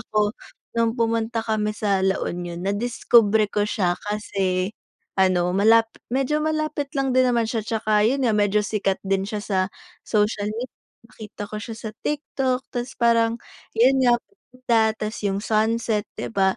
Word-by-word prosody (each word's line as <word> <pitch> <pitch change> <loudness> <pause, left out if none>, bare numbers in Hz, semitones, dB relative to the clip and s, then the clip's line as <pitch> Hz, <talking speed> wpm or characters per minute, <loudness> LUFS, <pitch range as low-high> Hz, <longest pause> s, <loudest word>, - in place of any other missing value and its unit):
ako 210 -2 0 0.4
no'ng 230 -1 +2
pumunta 230 0 0
kami 215 -1 0
sa 200 -3 +1
La 190 0 +1
Union, 175 -1 -4
nadiskubre 215 +1 +3
ko 205 - +1
siya 185 -4 0
kasi 195 -2 -1 0.4
ano 180 -2 +3
malap 225 +4 +4 0.2
medyo 270 +4 +1
malapit 310 -2 -1
lang 270 -1 +1
din 255 0 +4
naman 235 -2 +2
siya 225 0 -1
tsaka 215 -2 +1
yun 265 +2 +1
nga 225 - +3
medyo 210 0 +2
sikat 200 -2 0
din 195 0 0
siya 210 0 -3
sa 195 -3 -1 0.5
social 210 -1 +1
med 250 +2 -4 0.3
nakita 215 -2 -9
ko 215 - -5
siya 225 0 -6
sa 220 -1 -6
TikTok 270 -3 -1
ta's 245 0 -4
parang 230 -1 +3 0.4
yun 260 +4 +5
nga 245 -2 +5
maganda 255 - -2
ta's 215 +2 -4
yung 195 0 0
sunset 220 0 0
'di - - -5
ba 190 -2 +2
220 Hz, 160 wpm, -23 LUFS, 205-240 Hz, 0.5 s, yun